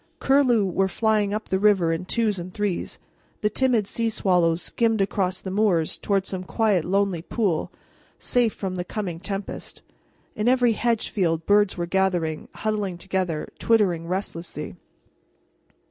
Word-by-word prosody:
Curlew 260 Hz, -6 st, +3 dB
were 190 Hz, +1 st, +1 dB
flying 210 Hz, +1 st, +1 dB
up 215 Hz, +1 st, -4 dB
the 190 Hz, -, +1 dB
river 190 Hz, -5 st, +3 dB
in 165 Hz, +2 st, -4 dB
twos 215 Hz, -1 st, 0 dB
and 175 Hz, +1 st, -7 dB
threes; 205 Hz, -2 st, -2 dB, 0.4 s
the 210 Hz, -, +1 dB
timid 245 Hz, -3 st, +2 dB
sea 230 Hz, +3 st, -1 dB
swallows 175 Hz, -6 st, +2 dB
skimmed 225 Hz, -2 st, +1 dB
across 190 Hz, -1 st, 0 dB
the 190 Hz, -, -6 dB
moors 190 Hz, -6 st, +2 dB
toward 195 Hz, -2 st, 0 dB
some 185 Hz, -2 st, -4 dB
quiet, 205 Hz, -3 st, +1 dB
lonely 195 Hz, -1 st, 0 dB
pool, 185 Hz, -3 st, -1 dB, 0.5 s
safe 240 Hz, -3 st, +2 dB
from 190 Hz, -2 st, -4 dB
the 180 Hz, -, -2 dB
coming 180 Hz, -3 st, -4 dB
tempest. 195 Hz, +1 st, -6 dB, 0.5 s
In 215 Hz, +2 st, -1 dB
every 250 Hz, -2 st, +4 dB
hedge 230 Hz, 0 st, 0 dB
field 165 Hz, -5 st, 0 dB
birds 205 Hz, -1 st, +3 dB
were 175 Hz, -, -1 dB
gathering, 175 Hz, -4 st, 0 dB
huddling 210 Hz, -4 st, -2 dB
together, 185 Hz, -4 st, -2 dB
twittering 185 Hz, -8 st, +2 dB
restlessly. 175 Hz, -2 st, -4 dB
195 Hz, 145 wpm, -24 LUFS, 180-215 Hz, 0.5 s, every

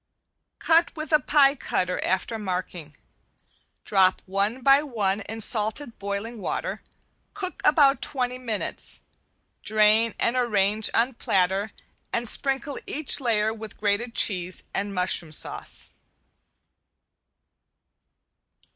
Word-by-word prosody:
Cut 330 Hz, +1 st, +2 dB
with 310 Hz, 0 st, -5 dB
a 305 Hz, -, +5 dB
pie 285 Hz, -2 st, +4 dB
cutter 180 Hz, -9 st, -2 dB
after 205 Hz, +5 st, -1 dB
marking. 180 Hz, -6 st, -5 dB, 0.9 s
Drop 190 Hz, -2 st, +2 dB
one 200 Hz, +6 st, -1 dB
by 275 Hz, +2 st, +6 dB
one 215 Hz, -8 st, -2 dB
in 225 Hz, +1 st, -5 dB
salted 220 Hz, +4 st, 0 dB
boiling 200 Hz, +3 st, -4 dB
water, -, -, -4 dB, 0.5 s
cook 375 Hz, -3 st, -6 dB
about 280 Hz, -4 st, +4 dB
twenty 250 Hz, -2 st, -1 dB
minutes, 230 Hz, -4 st, -4 dB, 0.6 s
drain 215 Hz, +1 st, +3 dB
and 235 Hz, -, 0 dB
arrange 215 Hz, -3 st, +2 dB
on 245 Hz, +3 st, +2 dB
platter 195 Hz, -1 st, 0 dB, 0.4 s
and 235 Hz, 0 st, -1 dB
sprinkle 270 Hz, +3 st, +1 dB
each 300 Hz, 0 st, +3 dB
layer 220 Hz, -4 st, +1 dB
with 220 Hz, -1 st, -10 dB
grated 215 Hz, +3 st, -1 dB
cheese 185 Hz, -3 st, 0 dB
and 200 Hz, 0 st, -3 dB
mushroom 180 Hz, -3 st, +1 dB
sauce. 155 Hz, -, -3 dB
220 Hz, 110 wpm, -25 LUFS, 195-255 Hz, 0.9 s, by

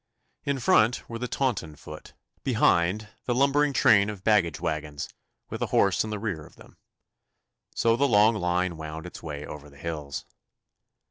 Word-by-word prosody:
In 140 Hz, -1 st, 0 dB
front 120 Hz, -1 st, +3 dB
were 115 Hz, 0 st, -6 dB
the 125 Hz, -, -3 dB
Taunton 110 Hz, -, -1 dB
foot; 75 Hz, +1 st, -11 dB, 0.3 s
behind, 95 Hz, +6 st, +2 dB, 0.2 s
the 120 Hz, -, 0 dB
lumbering 140 Hz, +2 st, +3 dB
train 105 Hz, -4 st, +5 dB
of 100 Hz, -3 st, -7 dB
baggage 100 Hz, -7 st, +2 dB
waggons, 75 Hz, -1 st, -3 dB, 0.4 s
with -, -, -4 dB
the -, -, -1 dB
horse 100 Hz, -3 st, +3 dB
in 110 Hz, -, -5 dB
the 105 Hz, -, -3 dB
rear 100 Hz, -7 st, -3 dB
of -, -, -16 dB
them. -, -, -17 dB, 1.0 s
So 115 Hz, 0 st, +3 dB
the 140 Hz, +4 st, +2 dB
long 110 Hz, -1 st, +5 dB
line 90 Hz, -3 st, 0 dB
wound 80 Hz, +1 st, -7 dB
its 90 Hz, -, -9 dB
way 75 Hz, -2 st, -6 dB
over 75 Hz, 0 st, -9 dB
the 70 Hz, -, -18 dB
hills. 75 Hz, -3 st, -5 dB
95 Hz, 165 wpm, -27 LUFS, 80-115 Hz, 1.0 s, train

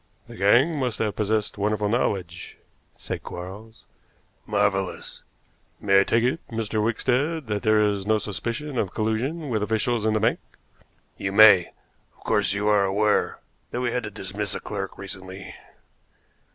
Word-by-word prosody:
"The -, -, -11 dB
gang 125 Hz, -, +3 dB
must 125 Hz, -6 st, -1 dB
have 105 Hz, -2 st, -1 dB
possessed 105 Hz, 0 st, -1 dB
wonderful 105 Hz, 0 st, 0 dB
knowledge," 95 Hz, -6 st, -2 dB, 0.4 s
said -, -, -5 dB
Quarles. 100 Hz, +6 st, -9 dB, 0.6 s
"Marvelous." 100 Hz, -2 st, -1 dB, 0.6 s
"May 100 Hz, -1 st, +4 dB
I -, -, +5 dB
take 115 Hz, +3 st, +1 dB
it, 130 Hz, +6 st, +1 dB
Mr. 110 Hz, -1 st, -2 dB
Wickstead, 135 Hz, +7 st, 0 dB
that 105 Hz, -2 st, -2 dB
there 110 Hz, -1 st, +3 dB
is 100 Hz, -1 st, -2 dB
no 110 Hz, 0 st, +3 dB
suspicion 115 Hz, +7 st, -4 dB
of 95 Hz, -, -2 dB
collusion 130 Hz, +9 st, -1 dB
with 110 Hz, -2 st, 0 dB
officials 110 Hz, +1 st, 0 dB
in 110 Hz, 0 st, +2 dB
the -, -, +2 dB
bank?" 110 Hz, -, +1 dB, 0.8 s
"You 95 Hz, -, -2 dB
may. 100 Hz, -4 st, +7 dB, 0.4 s
Of -, -, -22 dB
course, -, -, +1 dB
you 100 Hz, +1 st, -1 dB
are 105 Hz, -1 st, +4 dB
aware 105 Hz, +2 st, +1 dB, 0.3 s
that 125 Hz, -, -3 dB
we 120 Hz, -1 st, 0 dB
had 125 Hz, +1 st, -1 dB
to 110 Hz, -, -6 dB
dismiss 100 Hz, 0 st, -4 dB
a -, -, -3 dB
clerk 100 Hz, -2 st, -5 dB
recently?" 95 Hz, -1 st, -8 dB
105 Hz, 155 wpm, -24 LUFS, 100-115 Hz, 0.8 s, may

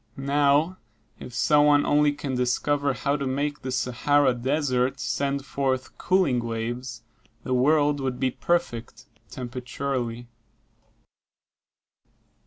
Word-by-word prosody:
Now 145 Hz, +5 st, +2 dB, 0.4 s
if -, -, -9 dB
some 145 Hz, +4 st, +3 dB
one 145 Hz, -1 st, +4 dB
only 150 Hz, 0 st, +3 dB
can 145 Hz, -2 st, -5 dB
discover 140 Hz, +3 st, 0 dB
how 140 Hz, +5 st, -1 dB
to 140 Hz, -2 st, -3 dB
make 145 Hz, +3 st, -2 dB
the 130 Hz, -, -4 dB
Sahara 130 Hz, +2 st, +2 dB
Desert 130 Hz, 0 st, 0 dB
send 140 Hz, 0 st, -2 dB
forth 130 Hz, -2 st, -2 dB
cooling 185 Hz, -9 st, +2 dB
waves, 115 Hz, +1 st, -4 dB, 0.4 s
the 130 Hz, -, -2 dB
world 145 Hz, +3 st, +3 dB
will 135 Hz, -1 st, -1 dB
be 130 Hz, +1 st, -1 dB
perfect, 125 Hz, -8 st, -2 dB, 0.2 s
temperaturally. 125 Hz, -1 st, -4 dB
135 Hz, 110 wpm, -25 LUFS, 125-145 Hz, 0.4 s, one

